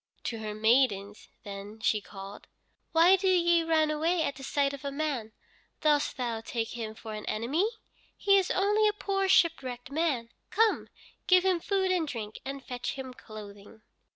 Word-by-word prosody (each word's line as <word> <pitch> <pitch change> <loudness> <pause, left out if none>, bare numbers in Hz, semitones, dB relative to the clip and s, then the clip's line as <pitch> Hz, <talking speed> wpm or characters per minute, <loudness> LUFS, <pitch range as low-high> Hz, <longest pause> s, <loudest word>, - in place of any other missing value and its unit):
To 230 - -3
her 215 -1 -5
maidens 215 -3 +2
then 200 +2 -8
she 215 -1 +1
called: 200 0 -10 0.4
"Why 335 +4 +6
do 380 +1 -1
ye 345 -2 +4
run 320 -2 +2
away 325 +3 +1
at 280 - -1
the 270 - -12
sight 280 +1 0
of 280 -1 -8
a 280 - -3
man? 275 -7 -2 0.5
Dost 300 -1 +2
thou 235 -3 -2
take 225 0 -3
him 220 -2 -5
for 220 0 -8
an 210 0 -6
enemy? 280 - 0 0.5
He 395 -1 +5
is 375 - -2
only 415 +3 +3
a 420 - +2
poor 390 -2 -1
shipwrecked 265 -9 +2
man. 280 -7 0 0.2
Come, 440 +3 +2 0.4
give 365 0 +5
him 370 -2 +3
food 380 +1 0
and 345 -4 +1
drink, 220 -5 -6
and 275 0 -6
fetch 250 0 -4
him 260 -1 -7
clothing." 210 -2 -12
275 Hz, 175 wpm, -29 LUFS, 220-345 Hz, 0.5 s, Why